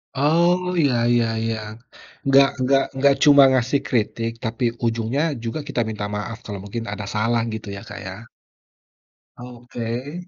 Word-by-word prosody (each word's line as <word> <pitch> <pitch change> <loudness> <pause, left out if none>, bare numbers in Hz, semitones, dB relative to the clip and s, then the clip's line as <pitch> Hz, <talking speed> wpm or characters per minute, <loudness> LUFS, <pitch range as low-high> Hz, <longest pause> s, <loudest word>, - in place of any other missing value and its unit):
Oh 175 +5 +2
iya 140 -6 +3 0.2
iya 120 -1 +3 0.2
iya. 115 0 -1 0.7
Nggak 135 0 +6
nggak 135 +1 +3
nggak 140 +1 +5
cuma 145 -2 +8
ngasih 130 +2 +1
kritik 115 -1 -1
tapi 115 +2 -3 0.2
ujungnya 115 +4 0 0.2
juga 115 +6 -3
kita 120 - -1
minta 105 -2 -4
maaf 115 +2 -4
kalau 100 -2 -6
mungkin 115 +3 -5
ada 105 -1 -6
salah 115 +2 +1
gitu 110 -1 -6
ya 100 - -8
Kak, - - -8
ya. 95 +4 -8 1.1
Oke. 120 +2 -6
120 Hz, 145 wpm, -22 LUFS, 115-140 Hz, 1.1 s, cuma